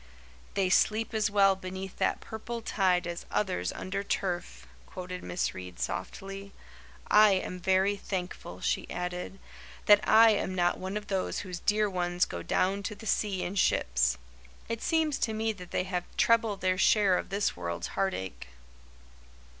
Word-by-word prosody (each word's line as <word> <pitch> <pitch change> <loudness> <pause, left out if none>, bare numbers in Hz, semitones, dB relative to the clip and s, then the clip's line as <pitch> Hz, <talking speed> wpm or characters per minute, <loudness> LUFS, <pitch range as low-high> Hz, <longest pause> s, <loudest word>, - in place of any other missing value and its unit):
"'They 195 -2 +2
sleep 220 +5 +2
as 215 -1 +1
well 195 -1 +4
beneath 190 0 -7
that - - +1
purple 230 +2 -6
tide 185 -4 +2
As 170 0 -5
others 90 - -1
under 195 +1 -4
turf,'" 180 -3 -3 0.2
quoted 180 -1 -7
Miss 180 - -2
Reade 90 -1 -9
softly. 195 0 -5 0.6
"I 210 -1 +7
am 185 -1 -2
very 190 +2 +2
thankful," 185 -2 -5
she - - -1
added, 180 +2 -4 0.5
"that 205 -1 +8
I 225 +1 +8
am 200 -3 -1
not 175 -1 +1
one 190 +2 -3
of 210 - -6
those 195 -2 -2
whose 180 -2 -6
dear 210 +2 +2
ones 180 -2 0
'go 85 - -6
down 190 - 0
to 210 +2 -4
the 220 - -12
sea 200 -3 0
in 180 - -3
ships.' 65 - +2 0.5
It 230 0 -3
seems 320 -3 +1
to 220 - 0
me 220 0 0
that 180 -3 -11
they - - 0
have 180 -1 -3
treble 225 -3 +3
their 185 0 0
share 200 -1 +4
of - - -3
this 200 +1 0
world's 85 -1 -4
heartache." 95 - -3
190 Hz, 160 wpm, -29 LUFS, 180-210 Hz, 0.6 s, that